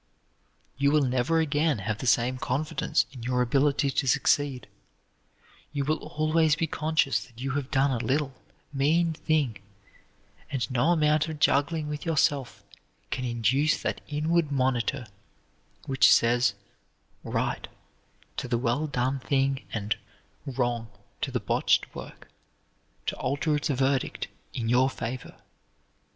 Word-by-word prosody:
You 140 0 +4
will 150 -1 +4
never 130 +5 +1
again 150 -2 +1
have 105 +1 -3
the 130 - -4
same 125 +1 +2
confidence 150 +7 0
in 130 -3 -10
your 125 +1 +1
ability 140 +2 +2
to 135 +1 0
succeed; 135 0 +2 1.1
you 140 -2 -1
will 155 +2 +1
always 155 0 +1
be 165 - 0
conscious 150 -8 0
that 115 -1 -18
you 135 +2 -2
have 140 -1 -2
done 135 +1 +2
a 120 -3 -1
little, 140 0 0 0.4
mean 160 +5 +2
thing, 150 -9 0 0.9
and 130 -3 -2
no 125 +4 +2
amount 155 -1 +3
of 155 - -5
juggling 150 +2 +2
with 150 -1 -5
yourself 145 - 0 0.5
can 130 - -2
induce 125 +6 +2
that - - -2
inward 155 +1 0
monitor 130 -1 0 0.8
which 135 -1 +5
says 120 +1 +4 0.7
"right" - - -2 0.7
to - - -3
the 120 -1 +1
well 125 +6 0
done 130 0 -1
thing 135 0 0
and 105 -1 -2 0.5
"wrong" 120 -3 -1 0.3
to - - -1
the - - -1
botched - - +1
work, - - -10 0.8
to - - -1
alter 145 +4 0
its 150 - -1
verdict 135 -1 0 0.2
in 115 -2 -3
your 125 +3 +4
favor. 125 -1 -6
135 Hz, 135 wpm, -27 LUFS, 125-150 Hz, 1.1 s, which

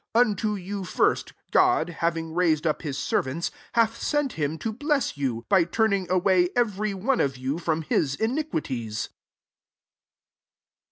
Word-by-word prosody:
26 245 +1 +6
Un - - -2
to 210 +2 -1
you 195 +2 -5
first, 180 - +1 0.2
God, 365 - +4
having 165 -1 -2
rai^ 165 -2 +3
ed 150 - -12
up 155 - 0
his 140 -4 -4
servant, 140 +3 -1 0.2
hati^ 230 +6 +2
sei^ 265 - -4
him 155 0 -2
to 220 +6 -3
bless 290 - 0
you, 125 -5 -2
by 190 -3 +5
turning 200 +1 +1
away 185 -1 +3
every 215 -4 0
one 240 +7 +1
of 135 -2 0
you 135 +5 -2
from 165 -2 -1
Ms 140 -2 +1
iniquities.' 150 - -2
180 Hz, 155 wpm, -26 LUFS, 155-220 Hz, 0.2 s, 26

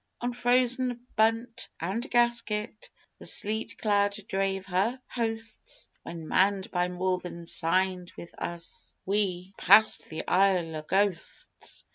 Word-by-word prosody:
On 245 0 -2
frozen 245 0 +2
bunt 225 +2 +1
and 200 - -3
gasket 235 -3 0 0.3
The - - -7
sleet 215 +2 0
cloud 205 -1 +2
drave 195 -1 -1
her 195 +7 0
hosts, 225 -2 -4
When, 165 -2 -8
manned 195 +2 +2
by 180 -1 +1
more 180 +1 -1
than 170 -1 -8
signed 180 +2 +1
with 170 - -10
us, 170 -1 -6
We 190 -2 -1
passed 220 0 +5
the 160 - -6
Isle 180 -4 +3
o' - - -4
Ghosts! 190 +2 -2
195 Hz, 125 wpm, -28 LUFS, 180-225 Hz, 0.3 s, passed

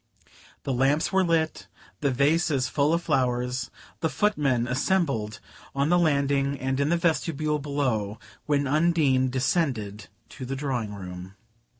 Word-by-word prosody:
The 135 - -1
lamps 135 +5 +2
were 190 0 +4
lit, 165 -2 0 0.3
the 140 - +1
vases 140 0 +2
full 145 +2 +1
of 170 +1 +1
flowers, 125 -3 0 0.3
the 160 - 0
foot 210 +5 +1
men 130 -5 +1
assembled 130 - 0 0.4
on 140 +2 +1
the 175 +1 +4
landing 140 -3 +1
and 135 +1 -1
in 140 +1 +1
the 170 - +3
vestibule 155 -3 0
below, 130 -8 -1 0.3
when 145 -1 +2
Undine 145 -3 +2
descended 125 - -1 0.2
to 130 - -9
the 130 +2 -3
drawing 125 -7 -3
room. 90 0 -8
140 Hz, 140 wpm, -26 LUFS, 125-155 Hz, 0.4 s, were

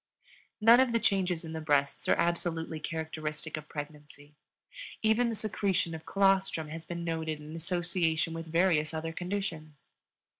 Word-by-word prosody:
None 230 +3 +7
of 260 -2 +3
the 230 - +3
changes 180 -5 +1
in 160 - -6
the 160 - -4
breasts 145 -2 +1
are - - +6
absolutely 165 -2 -1
characteristic 155 -1 -4
of 150 -1 -8
pregnancy; 145 0 -9 0.7
even 220 +2 +3
the 230 - -2
secretion 200 -5 0
of 160 0 -8
colostrum 195 -5 +2
has 160 +1 -6
been 170 +1 -5
noted 160 -2 -2
in 150 +1 -9
association 165 -1 0
with 165 0 -6
various 160 -2 +2
other 165 +1 -3
conditions. 165 -6 -5
165 Hz, 150 wpm, -30 LUFS, 155-185 Hz, 0.7 s, None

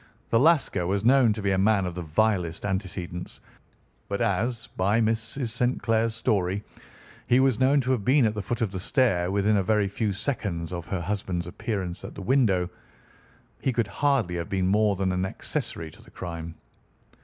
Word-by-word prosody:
The 115 - +4
Lascar 140 - +3
was 100 +3 -1
known 125 -2 +5
to 105 -1 -6
be 100 - +1
a 95 - +2
man 100 -1 +3
of 90 - -3
the 90 - -5
vilest 85 +1 0
antecedents, 95 -3 -4 0.7
but - - -2
as, 115 0 0
by 100 +4 +2
Mrs. 115 +3 0
St. 120 +3 0
Clair's 115 0 +1
story, 100 -3 0 0.6
he 125 - +4
was 130 -3 +3
known 135 +2 +4
to 130 +1 -1
have 120 -6 0
been 130 +3 +4
at 105 - +1
the 105 - -3
foot 120 +5 -3
of 110 -4 0
the 95 - -4
stair 95 -5 +2
within 100 +2 +2
a - - +3
very 105 +1 +2
few 105 +2 -1
seconds 100 - -3
of 85 -2 -5
her 95 -3 -2
husband's 90 -2 -2
appearance 90 -1 -4
at - - -8
the 100 - -7
window, 100 -7 +2 0.9
he 130 - +1
could 115 -2 +1
hardly 120 -2 0
have 85 -1 -4
been 95 -1 0
more 105 +1 +3
than 95 0 0
an 90 0 -1
accessory 80 -3 -3
to - - -15
the - - -17
crime. 85 -2 -7
100 Hz, 190 wpm, -26 LUFS, 90-115 Hz, 0.9 s, known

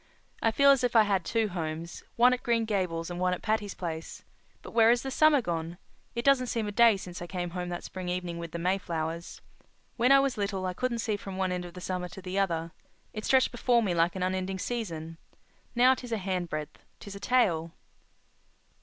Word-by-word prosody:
I 225 - +3
feel 280 +5 +5
as 270 -2 +3
if 245 -1 0
I 225 - +8
had 195 -3 +1
two 225 +3 0
homes—one 170 +8 0
at 250 - -2
Green 230 -1 +1
Gables 180 -5 -2
and 175 - -5
one 180 0 +1
at - - -13
Patty's 215 -2 -1
Place. 165 -2 -6 0.4
But - - -9
where 225 -1 +5
has 240 +1 +3
the 270 - -4
summer 295 -2 +4
gone? 170 -2 -3 0.4
It 235 - -3
doesn't 270 -2 +4
seem 230 -2 -1
a - - -3
day 225 -1 +5
since 180 -1 -8
I 175 - -5
came 175 -1 -4
home 180 0 -4
that 175 0 -5
spring 185 -1 -6
evening 180 -1 -3
with 170 -1 -6
the - - -4
Mayflowers. 170 -2 -3 0.6
When 245 +2 +3
I 275 - +8
was 270 -5 0
little 200 -2 -2
I 185 - -2
couldn't 245 +4 -1
see 215 -2 0
from 195 -2 -7
one 190 -1 0
end 180 0 -3
of 175 0 -11
the 180 - -8
summer 180 0 -3
to 190 - -10
the 185 +1 -2
other. 165 -4 -1 0.4
It 215 0 -5
stretched 260 -1 +4
before 240 -1 +2
me 190 -4 0
like 170 +2 +2
an 185 - -2
unending 185 +1 -1
season. 165 -8 -4 0.6
Now, 250 +2 +6
''tis 250 -2 -8
a 225 - +1
handbreadth, 180 -6 -3 0.2
'tis 200 - -9
a - - -7
tale. 180 -10 +2
190 Hz, 215 wpm, -29 LUFS, 175-230 Hz, 0.6 s, I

